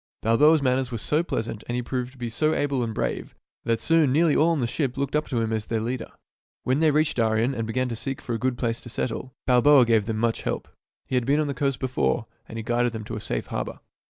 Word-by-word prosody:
Balboa's 150 +7 +5
manners 130 -1 +1
were 115 - -2
so 150 +8 +1
pleasant, 115 -9 -4
and 120 - -1
he 125 - -1
proved 125 0 -3
to - - -19
be 120 -1 -4
so 155 +7 +1
able 140 -3 0
and 115 - -2
brave, - - -3 0.3
that 115 -1 +1
soon 165 -4 +3
nearly 155 +2 +3
all 160 - +4
on 165 -3 +1
the 125 - +1
ship 130 +2 -2
looked 140 +1 -1
up 150 - 0
to 125 - -1
him 110 -1 -1
as 110 -1 -2
their 115 - 0
leader. 120 +3 -3 0.5
When 130 +3 +1
they 160 -1 +4
reached 150 0 +1
Darien 115 +2 +2
and 115 -3 -3
began 130 +3 0
to 115 - -3
seek 135 +3 -4
for 120 - -5
a 115 - -2
good 130 -1 0
place 115 -2 -2
to 120 - -10
settle, 130 +2 -4
Balboa 130 +1 +6
gave 110 -3 +2
them 110 -2 -1
much 115 0 0
help. - - -3 0.4
He - - -9
had 125 -1 +1
been 145 +2 +3
on 155 - +2
the 140 - -2
coast 135 0 -1
before, 125 - 0 0.2
and 115 - -7
he 115 - -4
guided 120 +1 +1
them 110 -1 -5
to - - -6
a - - -5
safe - - -2
harbor. - - -4
125 Hz, 265 wpm, -25 LUFS, 115-140 Hz, 0.5 s, Balboa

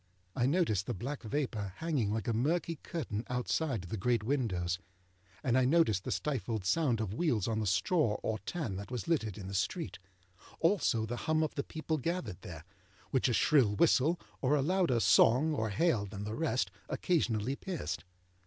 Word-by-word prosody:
I 125 -1 +2
noticed 135 - +1
the - - -2
black 130 +9 -4
vapour 110 -6 -2
hanging 145 -11 0
like 110 -2 -2
a 115 - +1
murky 160 +7 0
curtain 140 - -4
outside 125 - -1
the 90 +5 -5
great 115 +3 +1
windows, 95 -9 0 0.6
and 125 -2 +2
I 130 - +4
noticed 125 - +3
the - - -2
stifled 120 -8 -2
sound 130 - +2
of 110 -3 -2
wheels 120 - +1
on 110 -1 0
the 110 - -1
straw 105 - +2
or 110 -1 -1
tan 115 - -4
that 100 +1 -7
was 125 -3 -4
littered 110 - 0
in 100 - -7
the 100 - -6
street; 150 - -2 0.6
also, 165 - +2
the 120 +2 -4
hum 155 0 +3
of 155 - -2
the 140 - -1
people 155 0 -3
gathered 135 - -3
there, 80 -3 -9 0.5
which 130 -1 +2
a - - +1
shrill 115 -2 +4
whistle, 165 - +3 0.2
or 140 +2 +3
a 140 - +2
louder 175 -6 +2
song 130 +7 +5
or 110 -6 -1
hail 105 - +1
than 100 +1 -6
the 105 +1 -4
rest, 125 - 0 0.2
occasionally 130 - 0
pierced. 170 - -4
120 Hz, 180 wpm, -32 LUFS, 105-155 Hz, 0.6 s, song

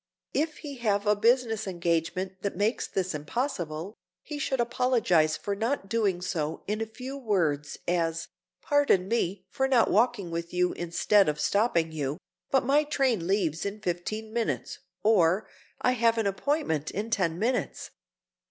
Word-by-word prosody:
If 310 +1 0
he 285 -3 -8
have 205 -3 +1
a 210 0 +4
business 225 0 +2
engagement 175 +1 -1
that 200 - -2
makes 210 +6 0
this 185 -1 -2
impossible, 170 - -3 0.3
he 295 -1 -6
should 265 -2 -1
apologize 230 -11 +2
for 200 - -3
not 225 0 -1
doing 200 -6 +1
so, 160 -4 -2
in 210 +2 -2
a 225 - -2
few 255 +5 -7
words, 170 - 0
as—"Pardon 175 - 0
me 195 -4 -1
for 265 - 0
not 255 -4 +3
walking 210 -4 +2
with 170 +1 -4
you 180 0 +2
instead 175 +3 +3
of 150 0 -2
stopping 170 -1 +2
you, 145 -2 -3 0.3
but 270 -2 +2
my 285 +3 +4
train 260 - 0
leaves 180 -5 +1
in 200 +1 -4
fifteen 215 +4 -3
minutes," 230 -1 -2 0.2
or, 195 -2 +3 0.4
"I 250 - +4
have 230 -2 +2
an 225 - +1
appointment 195 - 0
in 215 +4 -4
ten 170 -6 +1
minutes." 240 +6 -1
200 Hz, 150 wpm, -28 LUFS, 170-235 Hz, 0.4 s, a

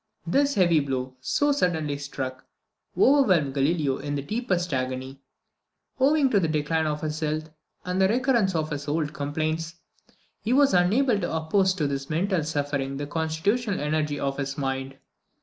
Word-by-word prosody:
This 280 +11 +2
heavy 170 -4 +4
blow, 130 -2 -3
so 290 - +1
suddenly 160 - 0
struck, 135 -2 -6 0.5
overwhelmed 185 - +4
Galileo 140 0 +1
in 145 0 -3
the 140 - -3
deepest 180 - -1
agony. 130 +1 -3 0.8
Owing 275 0 +4
to 205 - +4
the 170 - +1
decline 155 +1 0
of 150 0 -2
his 155 0 -3
health, 155 0 -2 0.3
and 180 +1 -1
the 190 - +5
recurrence 235 -4 +2
of 155 -1 -1
his 145 0 -4
old 150 0 -1
complaints, 155 +3 -2 0.7
he 230 - 0
was 280 -2 +4
unable 210 +6 +3
to 175 - -2
oppose 185 +4 +2
to 160 -6 -1
this 140 -1 -3
mental 175 +2 0
suffering 140 -2 -2
the 145 - -3
constitutional 165 +9 -1
energy 150 -1 -1
of 135 0 -2
his 140 +1 -3
mind. 135 -1 -3
155 Hz, 160 wpm, -26 LUFS, 145-190 Hz, 0.8 s, the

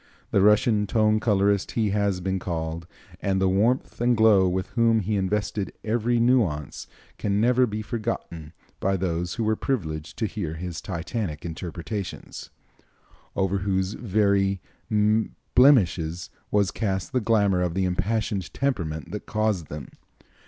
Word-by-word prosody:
The 100 - +3
Russian 105 +1 +4
tone 110 0 +3
colorist 100 -2 +1
he 110 -3 +1
has 100 -2 0
been 95 +1 -1
called, 85 -1 -4 0.3
and 95 -1 +1
the 95 - +3
warmth 110 +8 +1
and 120 -1 +3
glow 105 -4 +5
with 95 +3 -3
which 115 -4 +3
he 105 +1 0
invested 100 +1 -1
every 120 +2 +1
nuance 110 - +1 0.3
can 100 -1 0
never 125 +2 +4
be 110 0 -4
forgotten 105 -9 -4 0.3
by 95 0 +1
those 85 -1 -2
who 115 - -1
were 110 0 +2
privileged 80 - -3
to 115 - 0
hear 95 -7 -4
his 85 0 -5
Titanic 85 -2 -4
interpretations, 85 +4 -6 0.9
over 95 0 +1
whose 95 0 0
very 100 -3 +1 0.9
blemishes 90 - +4 0.2
was 100 -2 +2
cast 95 -1 -2
the 125 - +2
glamor 100 -4 +2
of 90 -1 -1
the 95 0 +1
impassioned 100 0 -1
temperament 85 - -2
that 105 - -6
caused 110 -7 0
them. 75 -2 -7
100 Hz, 140 wpm, -25 LUFS, 90-110 Hz, 0.9 s, glow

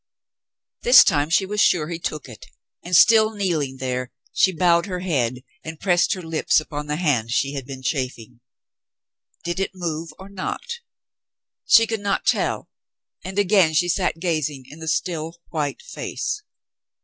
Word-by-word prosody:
This - - +8
time 145 -3 +1
she 185 +4 +3
was 210 +2 -1
sure 155 -4 +3
he 170 -1 -4
took 155 -4 -5
it, 110 -6 -12 0.4
and, 175 +1 -1
still 220 +2 +6
kneeling 160 -10 -1
there, 125 -1 -3 0.2
she 190 - +3
bowed 170 +1 +2
her 180 -2 -4
head 125 -8 -1 0.2
and 160 0 -8
pressed 180 +1 +2
her 185 - -8
lips 160 -1 +1
upon 150 -1 -6
the 150 - -1
hand 145 -9 0
she 135 +4 0
had 135 -3 -6
been 135 -1 -8
chafing. 125 -4 -4 1.0
Did 175 +2 -3
it 195 0 -2
move 165 -2 -4
or 190 - -11
not? 200 - -5 0.9
She 230 - +7
could 225 -1 -3
not 200 -1 -1
tell, - - 0 0.6
and 190 +1 -7
again 190 -5 +3
she 175 +3 +3
sat 180 -2 0
gazing 155 -6 -2
in 155 - -12
the 160 - -8
still, 165 0 -2
white 150 -3 -3
face. 450 -3 -4
165 Hz, 160 wpm, -22 LUFS, 145-190 Hz, 1.0 s, This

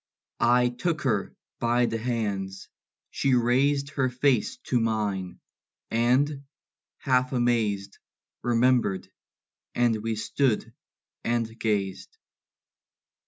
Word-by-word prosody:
I 125 0 +4
took 160 +6 -2
her 110 -7 0 0.2
by 120 +1 +2
the 115 -1 -2
hands; 100 -5 -3 0.4
she 135 -2 +2
raised 140 +4 +2
Her 135 -3 0
face 130 - +1
to 125 - +1
mine; 105 -5 -1 0.5
and, 135 +5 +2 0.5
half 130 -1 +1
amazed, 110 -5 0 0.4
Remembered; 120 -4 +2 0.6
and 115 -3 +2
we 115 0 -2
stood 120 +2 0 0.5
and 115 -1 0
gazed. 100 - -2
120 Hz, 95 wpm, -26 LUFS, 110-130 Hz, 0.6 s, I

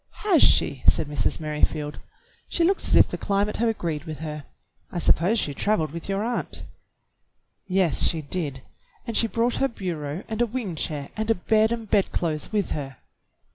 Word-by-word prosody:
"Has 365 -8 +5
she.?" 135 - +4
said - - +4
Mrs. 145 -1 0
Merrifield. 150 -1 -1 0.5
"She 340 - +1
looks 385 +4 +2
as - - +3
if - - +7
the - - -5
climate 205 +1 0
had 230 +1 +2
agreed 165 -8 -3
with 155 -2 -6
her. 150 -2 -6 0.5
I - - -5
suppose 175 +5 +3
she 145 - 0
traveled 160 -2 0
with 170 +4 -7
your 195 +1 0
aunt." 240 +1 -3 1.0
"Yes, 185 -4 +3
she 160 -2 -1
did, 140 -4 -3 0.4
and 230 -2 -4
she 230 - +4
brought 235 +2 0
her 270 - +2
bureau 170 - -5
and 220 +1 -3
a 240 - +3
wing 225 -5 -4
chair 150 -2 -3
and 220 +1 -3
a 225 - +4
bed 220 +4 +2
and 230 -2 -3
bedclothes 170 -6 0
with 205 -4 -1
her." 135 -4 -4
185 Hz, 180 wpm, -25 LUFS, 150-220 Hz, 1.0 s, if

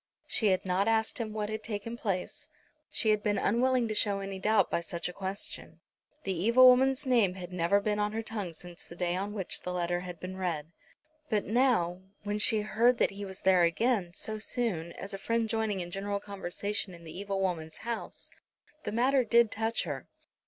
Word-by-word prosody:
She 220 - +1
had 185 -1 +2
not 190 +2 +1
asked 220 +1 +1
him 220 -2 -3
what 210 -1 -3
had 215 0 -3
taken 220 +1 -4
place. 195 -6 -3 0.4
She 225 - +2
had 210 -1 +2
been 205 -1 +1
unwilling 245 +3 +2
to 215 - -2
show 205 -1 +1
any 195 -1 -5
doubt 215 +2 +3
by - - +1
such 170 0 -4
a 180 - -6
question. 195 +1 -6 0.4
The 195 - -1
evil 230 +9 +6
woman's 265 +2 +5
name 230 -8 +3
had 180 -1 -8
never 180 +3 +3
been 210 0 -1
on 210 0 +1
her 225 +1 -2
tongue 210 -6 -4
since 175 +2 -10
the 170 - -12
day 175 0 -1
on 200 +2 -2
which 190 -4 -2
the 180 - -4
letter 175 0 -1
had 180 -2 -7
been 185 +1 -6
read. 165 -4 -3 0.6
But 210 -3 +1
now, 215 -7 +2 0.2
when 205 0 -2
she 215 +1 +5
heard 235 +4 +3
that - - +2
he 200 +1 -6
was 190 0 -8
there 185 -2 +5
again, 185 +2 +2
so 215 0 -3
soon, 210 -8 0
as 195 - -8
a 195 - -5
friend 230 +2 0
joining 220 -3 -1
in 175 0 -6
general 200 +1 -2
conversation 200 0 -4
in 170 - -14
the 160 -1 -9
evil 195 +1 -3
woman's 165 -4 -2
house, 235 -1 -5 0.5
the - - -2
matter 255 +4 +3
did 235 -1 +4
touch 225 +1 0
her. - - -5
205 Hz, 205 wpm, -30 LUFS, 180-225 Hz, 0.6 s, evil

